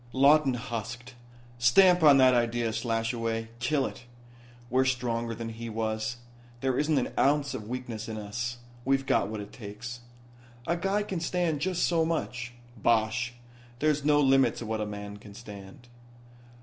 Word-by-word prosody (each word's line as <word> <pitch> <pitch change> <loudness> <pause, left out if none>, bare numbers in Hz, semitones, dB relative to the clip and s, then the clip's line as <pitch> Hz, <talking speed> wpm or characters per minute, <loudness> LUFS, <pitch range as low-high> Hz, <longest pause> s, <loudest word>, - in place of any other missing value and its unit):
Lawton 140 0 +5
husked: 120 +1 -6 0.5
"Stamp 180 +9 +6
on 145 -3 +8
that 130 -1 +6
idea, 120 -1 +1
Slashaway 115 0 -1
kill 135 +3 +1
it. 120 - -7 0.6
We're 130 +2 +3
stronger 120 -3 -1
than 115 0 -5
he 115 +1 -7
was. 110 +1 -2 0.4
There 130 -1 +1
isn't 150 0 +2
an 130 - -1
ounce 145 +1 +2
of 105 - -6
weakness 120 -3 -5
in 110 - -4
us. 120 +3 -4 0.3
We've 135 +1 +1
got 100 - +2
what 110 0 -5
it 100 - -10
takes." 120 +3 -8 0.7
"A 170 - +1
guy 195 +4 0
can 190 -4 -3
stand 165 -2 0
just 180 +1 0
so 165 -2 +3
much." 125 -7 -3 0.2
"Bosh. 115 +2 +1 0.4
There's 150 +1 +1
no 145 0 +4
limit 135 -4 +4
to 120 - -6
what 110 0 -2
a 105 - -2
man 105 0 -7
can 100 -1 -13
stand." 105 +3 -11
120 Hz, 160 wpm, -28 LUFS, 115-140 Hz, 0.7 s, on